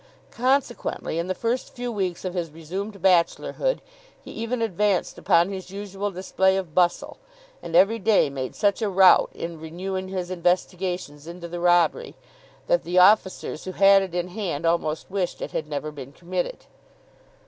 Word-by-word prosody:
Consequently, 255 Hz, -, -1 dB
in 170 Hz, -, -2 dB
the 185 Hz, -, -2 dB
first 235 Hz, +2 st, -2 dB
few 245 Hz, -1 st, -4 dB
weeks 190 Hz, -5 st, -3 dB
of 185 Hz, -, -3 dB
his 175 Hz, -3 st, -3 dB
resumed 185 Hz, +6 st, -7 dB
bachelorhood, 190 Hz, -, +1 dB, 0.4 s
he -, -, -12 dB
even 230 Hz, +2 st, -3 dB
advanced 205 Hz, -3 st, 0 dB
upon 170 Hz, +3 st, +3 dB
his 190 Hz, -1 st, -7 dB
usual 200 Hz, +1 st, -4 dB
display 190 Hz, 0 st, +1 dB
of 180 Hz, -5 st, -5 dB
bustle, 175 Hz, 0 st, +1 dB, 0.4 s
and 165 Hz, -, -5 dB
every 200 Hz, +6 st, +5 dB
day 210 Hz, -4 st, +3 dB
made 135 Hz, -2 st, -5 dB
such 205 Hz, +1 st, +1 dB
a 215 Hz, -, 0 dB
rout 190 Hz, -1 st, +6 dB
in 165 Hz, -1 st, -6 dB
renewing 185 Hz, +4 st, -5 dB
his 185 Hz, -1 st, -4 dB
investigations 180 Hz, -3 st, -2 dB
into 170 Hz, 0 st, -8 dB
the 175 Hz, +1 st, -6 dB
robbery, 175 Hz, -, +2 dB, 0.5 s
that -, -, +2 dB
the 180 Hz, -, -3 dB
officers 190 Hz, -3 st, +3 dB
who 185 Hz, -, -5 dB
had 195 Hz, +1 st, +6 dB
it 185 Hz, -3 st, -5 dB
in 175 Hz, 0 st, -2 dB
hand 180 Hz, -6 st, -4 dB
almost 165 Hz, -1 st, -1 dB
wished 190 Hz, -3 st, -2 dB
it -, -, -5 dB
had 155 Hz, -, -3 dB
never 150 Hz, 0 st, -4 dB
been 140 Hz, -3 st, -9 dB
committed. 180 Hz, -, -4 dB
185 Hz, 165 wpm, -24 LUFS, 170-200 Hz, 0.5 s, rout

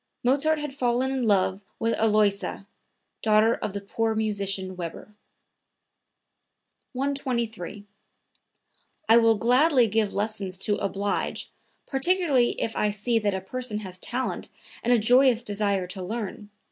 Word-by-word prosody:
Mozart 285 Hz, +5 st, +2 dB
had 295 Hz, -2 st, -5 dB
fallen 255 Hz, 0 st, 0 dB
in 265 Hz, -1 st, -1 dB
love 195 Hz, -1 st, +2 dB, 0.2 s
with 230 Hz, 0 st, 0 dB
Aloysia, 210 Hz, -2 st, +1 dB, 0.6 s
daughter 215 Hz, +1 st, +4 dB
of 205 Hz, -, -4 dB
the 200 Hz, -, -4 dB
poor 225 Hz, +2 st, -1 dB
musician 200 Hz, -3 st, -1 dB
Weber.) 175 Hz, +4 st, -7 dB, 1.8 s
123. 235 Hz, -7 st, -3 dB, 1.2 s
"I 225 Hz, -, +7 dB
will 230 Hz, -1 st, +5 dB
gladly 250 Hz, +4 st, +4 dB
give 215 Hz, -1 st, 0 dB
lessons 200 Hz, -3 st, -2 dB
to 205 Hz, +2 st, 0 dB
oblige, 200 Hz, 0 st, -2 dB, 0.3 s
particularly 285 Hz, -4 st, +2 dB
if 225 Hz, -, -2 dB
I 210 Hz, -, +1 dB
see 210 Hz, +3 st, 0 dB
that 205 Hz, -2 st, 0 dB
a 190 Hz, -, -3 dB
person 220 Hz, +1 st, -3 dB
has 185 Hz, -2 st, -9 dB
talent 250 Hz, +5 st, -3 dB, 0.3 s
and 240 Hz, -, 0 dB
a 245 Hz, -, +6 dB
joyous 245 Hz, +2 st, +4 dB
desire 200 Hz, -3 st, 0 dB
to 185 Hz, +1 st, -6 dB
learn. 210 Hz, +1 st, -5 dB
220 Hz, 130 wpm, -26 LUFS, 200-250 Hz, 1.8 s, I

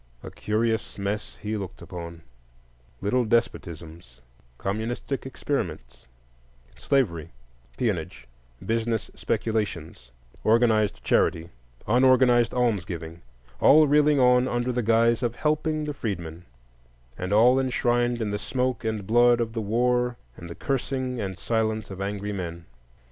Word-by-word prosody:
A -, -, -8 dB
curious 110 Hz, +1 st, -1 dB
mess 100 Hz, +1 st, -3 dB
he 105 Hz, +1 st, -2 dB
looked 95 Hz, -3 st, -6 dB
upon: 85 Hz, -1 st, -8 dB, 0.8 s
little 125 Hz, +5 st, +1 dB
despotisms, 85 Hz, -, -3 dB, 0.4 s
communistic 115 Hz, +7 st, -3 dB
experiments, 85 Hz, -, -4 dB, 0.7 s
slavery, 85 Hz, -, 0 dB, 0.5 s
peonage, -, -, -2 dB, 0.4 s
business 115 Hz, 0 st, -1 dB
speculations, 100 Hz, -, -3 dB, 0.3 s
organized 110 Hz, -2 st, +2 dB
charity, 85 Hz, 0 st, +1 dB, 0.4 s
unorganized 125 Hz, 0 st, +4 dB
almsgiving,—all 85 Hz, -, +1 dB
reeling 150 Hz, 0 st, +4 dB
on 125 Hz, 0 st, +4 dB
under 120 Hz, 0 st, -1 dB
the 125 Hz, 0 st, -1 dB
guise 115 Hz, +1 st, +3 dB
of 120 Hz, -2 st, -1 dB
helping 155 Hz, +1 st, 0 dB
the 150 Hz, -, -3 dB
freedmen, 85 Hz, -, -5 dB, 0.7 s
and 90 Hz, +6 st, -5 dB
all 120 Hz, +5 st, +5 dB
enshrined 120 Hz, -2 st, +1 dB
in 105 Hz, -, -2 dB
the 105 Hz, -, -2 dB
smoke 125 Hz, +1 st, -2 dB
and 110 Hz, -3 st, -2 dB
blood 120 Hz, +2 st, +4 dB
of 115 Hz, -1 st, -2 dB
the 115 Hz, -, -2 dB
war 125 Hz, +3 st, +1 dB, 0.2 s
and 85 Hz, -, -10 dB
the 85 Hz, -, -7 dB
cursing 130 Hz, -2 st, -2 dB
and 95 Hz, -2 st, -4 dB
silence 110 Hz, -1 st, -1 dB
of 95 Hz, 0 st, -7 dB
angry 100 Hz, +1 st, -3 dB
men. 85 Hz, -3 st, -6 dB
110 Hz, 120 wpm, -25 LUFS, 95-125 Hz, 0.8 s, all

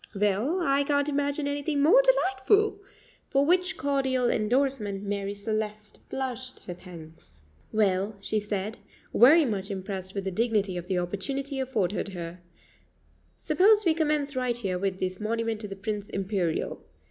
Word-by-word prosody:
"Well, 210 Hz, -, +1 dB
I 280 Hz, -3 st, +2 dB
can't 285 Hz, 0 st, +1 dB
imagine 285 Hz, 0 st, 0 dB
anything 285 Hz, +1 st, -1 dB
more 390 Hz, +12 st, +7 dB
delightful;" 410 Hz, -3 st, +2 dB, 0.5 s
for 275 Hz, +1 st, +3 dB
which 360 Hz, +3 st, +2 dB
cordial 265 Hz, -3 st, +1 dB
endorsement 215 Hz, -3 st, 0 dB
Marie 200 Hz, 0 st, -3 dB
Celeste 215 Hz, 0 st, -4 dB
blushed 255 Hz, -1 st, -5 dB
her 180 Hz, -, -7 dB
thanks. 160 Hz, -, -14 dB, 0.3 s
"Well," 205 Hz, -1 st, +1 dB
she 215 Hz, +2 st, -1 dB
said, 210 Hz, +1 st, -4 dB, 0.3 s
very 300 Hz, +7 st, +7 dB
much 200 Hz, -4 st, -2 dB
impressed 190 Hz, -1 st, -5 dB
with 195 Hz, -, -2 dB
the 190 Hz, -, -2 dB
dignity 210 Hz, -2 st, 0 dB
of 175 Hz, 0 st, -5 dB
the 185 Hz, -1 st, 0 dB
opportunity 270 Hz, -, -3 dB
afforded 210 Hz, -7 st, -1 dB
her, 170 Hz, 0 st, -6 dB, 1.0 s
"suppose 420 Hz, +2 st, +4 dB
we 330 Hz, -, +5 dB
commence 300 Hz, -3 st, 0 dB
right 250 Hz, -2 st, 0 dB
here 190 Hz, -6 st, -2 dB
with 190 Hz, -1 st, -2 dB
this 185 Hz, 0 st, -2 dB
monument 225 Hz, 0 st, -1 dB
to 210 Hz, -, -4 dB
the 195 Hz, -, -7 dB
Prince 205 Hz, 0 st, -4 dB
Imperial. 190 Hz, -4 st, -2 dB
220 Hz, 145 wpm, -27 LUFS, 195-280 Hz, 1.0 s, more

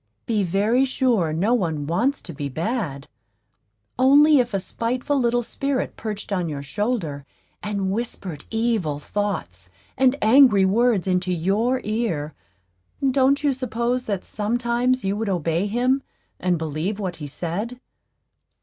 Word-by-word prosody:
Be 220 Hz, -3 st, +1 dB
very 205 Hz, +8 st, +2 dB
sure 245 Hz, -, +1 dB
no 190 Hz, +9 st, +1 dB
one 160 Hz, -10 st, 0 dB
wants 235 Hz, -, 0 dB
to 170 Hz, -, -7 dB
be 140 Hz, 0 st, -4 dB
bad; 165 Hz, -, -3 dB, 0.9 s
only 285 Hz, +3 st, +6 dB
if 245 Hz, -1 st, +1 dB
a 195 Hz, -, 0 dB
spiteful 250 Hz, +8 st, -1 dB
little 240 Hz, -1 st, +1 dB
spirit 275 Hz, +2 st, -2 dB
perched 210 Hz, -2 st, -6 dB
on 180 Hz, -3 st, -1 dB
your 140 Hz, -2 st, -5 dB
shoulder, 175 Hz, -, -2 dB, 0.4 s
and 200 Hz, -2 st, -2 dB
whispered 195 Hz, -8 st, -4 dB
evil 225 Hz, -10 st, 0 dB
thoughts 205 Hz, +7 st, -4 dB, 0.3 s
and 260 Hz, 0 st, +3 dB
angry 220 Hz, -4 st, +6 dB
words 220 Hz, 0 st, +2 dB
into 185 Hz, -1 st, 0 dB
your 205 Hz, +9 st, +1 dB
ear, 210 Hz, -9 st, -2 dB, 0.8 s
don't 275 Hz, +2 st, +3 dB
you 285 Hz, -2 st, +3 dB
suppose 245 Hz, 0 st, -2 dB
that 200 Hz, -4 st, -3 dB
sometimes 240 Hz, +3 st, 0 dB
you 195 Hz, +1 st, 0 dB
would 215 Hz, 0 st, -2 dB
obey 170 Hz, +1 st, 0 dB
him 250 Hz, +5 st, +1 dB, 0.4 s
and 180 Hz, -1 st, +1 dB
believe 160 Hz, +6 st, -3 dB
what 185 Hz, -4 st, -4 dB
he 150 Hz, -2 st, -6 dB
said? 190 Hz, -, -4 dB
210 Hz, 140 wpm, -23 LUFS, 175-245 Hz, 0.9 s, only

